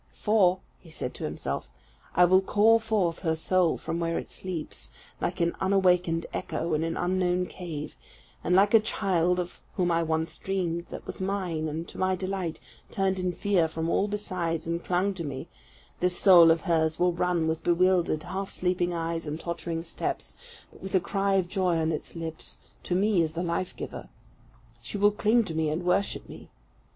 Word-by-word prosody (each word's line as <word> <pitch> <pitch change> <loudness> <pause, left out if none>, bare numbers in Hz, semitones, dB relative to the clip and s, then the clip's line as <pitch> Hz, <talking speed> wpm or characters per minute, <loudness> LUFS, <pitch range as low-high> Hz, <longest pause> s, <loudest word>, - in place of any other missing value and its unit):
"For," 190 -4 +3 0.3
said 125 -5 -4
he - - -12
to - - -3
himself, - - -4 0.5
"I 180 - +7
will 185 +2 +5
call 215 +4 +4
forth 210 -7 0
her 160 -3 0
soul 175 +1 +2
from 165 - -4
where 165 0 -1
it - - -6
sleeps, 180 -5 -5 0.3
like - - -2
an 170 0 +1
unawakened 180 -3 +2
echo, 165 0 -2
in 155 +1 +1
an 165 0 -2
unknown 180 0 +1
cave; 165 -5 -7 0.5
and 180 - +2
like 200 +3 +5
a 225 - +9
child, 180 -5 +1
of 180 0 -5
whom 175 -1 +1
I 165 0 +2
once 160 0 -1
dreamed, 175 -3 -2
that - - -8
was - - -6
mine, 185 -5 -1
and 160 +2 -4
to - - -10
my 185 0 +2
delight 185 -3 -3 0.3
turned 190 -1 0
in 180 0 0
fear 180 -1 +1
from 160 +1 -3
all 200 - +2
besides, 185 -6 -2
and 170 +1 -2
clung 185 +3 +1
to 180 -3 -5
me, 140 -3 -5 0.5
this 180 0 +1
soul 175 -4 +8
of 165 0 +4
hers 160 -3 +1
will 180 0 +2
run 175 -1 +1
with 160 0 -2
bewildered, 175 -2 +2
half 190 +3 -4
sleeping 180 -1 0
eyes, 165 -1 -3
and 150 +2 -4
tottering 170 -1 -4
steps, - - -4 0.4
but - - -17
with 195 0 -3
a - - +6
cry 195 +2 0
of 185 -2 +2
joy 180 -2 +1
on 160 0 +1
its 155 - -5
lips, 165 -1 -5 0.2
to 175 - -2
me 200 -1 +3
as 160 -1 -1
the 170 +2 -2
life 175 +1 -2
giver. - - -7 0.7
She 120 - -5
will 205 +1 +5
cling 220 +3 +3
to 195 - -5
me 160 -1 0
and 160 +4 -2
worship 190 +3 0
me. - - -11
175 Hz, 190 wpm, -27 LUFS, 165-190 Hz, 0.7 s, a